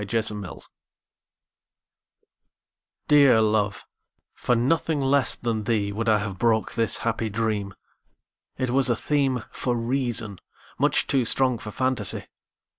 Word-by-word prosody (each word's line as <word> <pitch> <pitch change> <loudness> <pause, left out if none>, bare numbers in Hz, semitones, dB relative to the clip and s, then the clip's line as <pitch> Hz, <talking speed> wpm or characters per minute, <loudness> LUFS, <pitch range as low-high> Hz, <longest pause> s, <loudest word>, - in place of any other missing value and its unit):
The - - -7
Dream 110 -1 0 2.6
DEAR 140 -6 +6
love, 105 -2 0 0.5
for 125 - 0
nothing 150 +5 0
less 135 -2 +1
than 115 -2 -3
theeWould 110 0 -1
I 110 - +4
have 100 -3 -5
broke 110 -2 +1
this 115 -2 +2
happy 115 -1 -1
dream; 105 -2 -2 0.8
It 130 -2 -2
was 135 0 +2
a 120 - +2
themeFor 130 -2 -1
reason, 115 -4 0 0.4
much - - +2
too 135 -2 +1
strong 125 0 +1
for 105 - -7
fantasy. 130 -3 -1
115 Hz, 115 wpm, -24 LUFS, 105-130 Hz, 2.6 s, DEAR